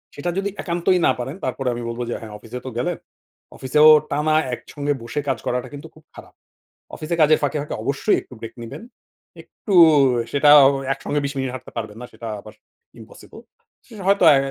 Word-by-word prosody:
সেটা 145 +5 -3
যদি 200 +1 -1
একান্তই 175 +1 0
না - - +4
পারেন, 130 +5 -5
তারপরেও 130 0 -2
আমি 120 - -6
বলবো 115 +1 -4
যে - - -2
হ্যাঁ 110 -2 -9
অফিসে 115 +4 -9
তো - - -4
গেলেন। 170 +8 -2 0.6
অফিসেও 150 +4 +5 0.2
টানা 150 +2 +1 0.2
একসঙ্গে 145 +3 -4
বসে 120 +5 -4
কাজ 135 -3 0
করাটা 125 0 -2
কিন্তু 140 0 -9
খুব - - -19
খারাপ। - - -13 0.6
অফিসে 155 +2 -4
কাজের 155 +1 +5
ফাঁকে, 145 +1 -1
ফাঁকে 150 - -6
অবশ্যই 140 +2 +1
একটু - - -15
ব্রেক 115 - -8
নিবেন। 115 - -9 0.6
একটু 205 - -6 0.6
সেটাও 145 0 +7 0.3
একসঙ্গে 145 +2 -3
২০ 140 - -2
মিনিট 135 -1 -2
হাঁটতে 130 0 -10
পারবেন 110 -2 -5
না। - - -7
সেটা 115 - -8
আবার 110 +1 -14 0.5
impossible. - - -14 0.4
সে - - -15
হয়তো 200 -1 +3
অ্যা 145 - +6
140 Hz, 180 wpm, -21 LUFS, 125-155 Hz, 0.6 s, সেটাও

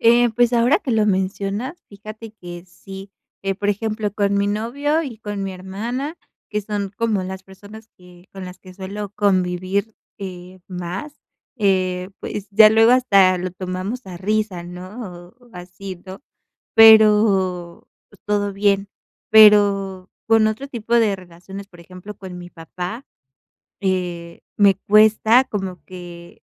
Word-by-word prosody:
Eh, 235 0 +5
pues 240 +1 +2
ahora 240 +8 +3
que 270 - -5
lo 215 -2 +2
mencionas, 200 - -2
fíjate 215 +2 -11
que 175 -4 -10
sí, 195 +2 -11 0.3
eh, 195 0 -1
por 205 +1 -3
ejemplo, 215 0 -2
con 200 -1 0
mi 200 0 +1
novio 280 +9 -1
y 245 -7 -7
con 205 -2 -5
mi 195 -1 -4
hermana, 230 - -5 0.3
que 210 - -1
son 205 -1 -4
como 220 -4 0
las 190 0 -6
personas 205 +3 -14
que 180 0 -18
con 195 -1 -8
las 180 0 -10
que 185 -1 -15
suelo 200 +2 -6
convivir, 190 +1 0 0.2
eh, 185 -1 -9
más, 180 - -6 0.4
eh, 185 -3 0
pues 205 -1 -6
ya 215 +1 +8
luego 225 +2 +5
hasta 195 -7 +4
lo 180 +1 -4
tomamos 185 +6 -5
a 180 - -8
risa, 205 -1 -2
¿no? 180 0 -10
O, 245 - -21
¿así, 180 +1 -9
no?, 190 +4 -10 0.6
pero, 210 -5 +5 0.2
pues 205 - -21
todo 205 -1 0
bien, 200 0 +1 0.4
pero 200 -3 +5 0.2
con 225 -1 +4
otro 220 +6 -4
tipo 235 -2 -2
de 215 -4 +3
relaciones, 185 +2 -11
por 175 -3 -18
ejemplo, 185 +4 -11
con 185 -3 -9
mi 175 0 -10
papá, 180 - -7 0.8
eh, 175 -3 -3 0.2
me 200 -2 +6
cuesta 215 +4 +4
como 190 -7 -5
que, 175 -2 -12
200 Hz, 145 wpm, -20 LUFS, 185-220 Hz, 0.8 s, ya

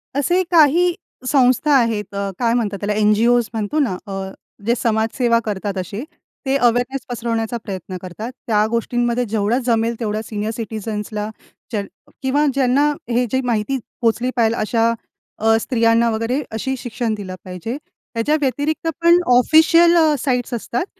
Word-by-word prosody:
असे 345 +6 +2
काही 340 +2 +5 0.4
संस्था 265 +2 +3
आहेत 215 -5 +1
अ, 200 0 -2
काय 235 -1 +2
म्हणतात 215 -4 -1
त्याला? 205 +1 0
NGOज 230 +2 +3
म्हणतो 220 +7 -1
ना, 245 -11 +1
अ, - - -7 0.5
जे 235 - +3
समाजसेवा 230 +2 +1
करतात 200 -1 -3
असे, 195 +5 -4 0.4
ते 265 - +1
अवेरनेस 245 +1 +1
पसरवण्याचा 230 -1 -2
प्रयत्न 185 -2 -6
करतात. 210 +7 -7 0.2
त्या 210 -1 +3
गोष्टींमध्ये 240 +1 0
जेवढं 220 +3 +1
जमेल 230 -1 +1
तेवढ्या 215 -1 -2
सीनियर 215 0 -3
सिटिझन्सला 215 -2 -4 0.4
ज्या 210 -3 -1 0.4
किंवा 280 +3 +2
ज्यांना 275 +2 +3 0.2
हे 245 +1 +2
जे 260 - +2
माहिती 240 +2 0 0.2
पोचली 235 +2 +1
पाहिजेल 230 -1 +2
अशा 230 +1 +2 0.5
अ, 225 +1 +4
स्त्रियांना 230 -1 +2
वगैरे 230 +5 -1
अशी 265 +4 -2
शिक्षण 240 -2 -3
दिलं 195 -3 -6
पाहिजे. 185 +8 -5 0.4
त्याच्या 235 +6 +1
व्यतिरिक्त 290 +4 -1
पण 340 +1 +6 0.2
ऑफिशियल 330 +5 +5
अ, 315 -2 +4
साईट्स 250 -2 -1
असतात 240 - -2
235 Hz, 145 wpm, -20 LUFS, 215-260 Hz, 0.5 s, पण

